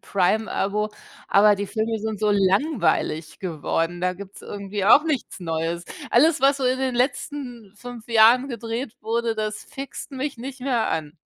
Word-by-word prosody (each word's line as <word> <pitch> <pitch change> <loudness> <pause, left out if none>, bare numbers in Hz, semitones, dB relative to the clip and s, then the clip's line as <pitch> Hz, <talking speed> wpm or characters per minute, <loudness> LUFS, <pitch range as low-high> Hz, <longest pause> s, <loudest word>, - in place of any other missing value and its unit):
Prime-Abo, 210 +1 0 0.4
aber 210 +1 +6
die 200 0 -4
Filme 220 +2 -2
sind 220 0 -4
so 210 - +2
langweilig 190 - +1
geworden. 165 0 -2
Da 180 0 +1
gibt's 200 +1 -11
irgendwie 200 -1 -4
auch 285 +8 +7
nichts 300 -10 -2
Neues. 165 0 -2 0.3
Alles, 300 +5 +4
was 275 +1 +4
so 265 - -2
in 255 +1 +2
den 260 -1 -1
letzten 245 -4 -3
5 240 0 -10
Jahren 235 +4 +5
gedreht 235 0 -4
wurde, 230 +1 -1
das 215 -1 -4
fixt 275 0 -8
mich 270 0 -3
nicht 265 +1 -7
mehr 250 -4 0
an. 155 -2 -3
220 Hz, 160 wpm, -23 LUFS, 195-255 Hz, 0.4 s, auch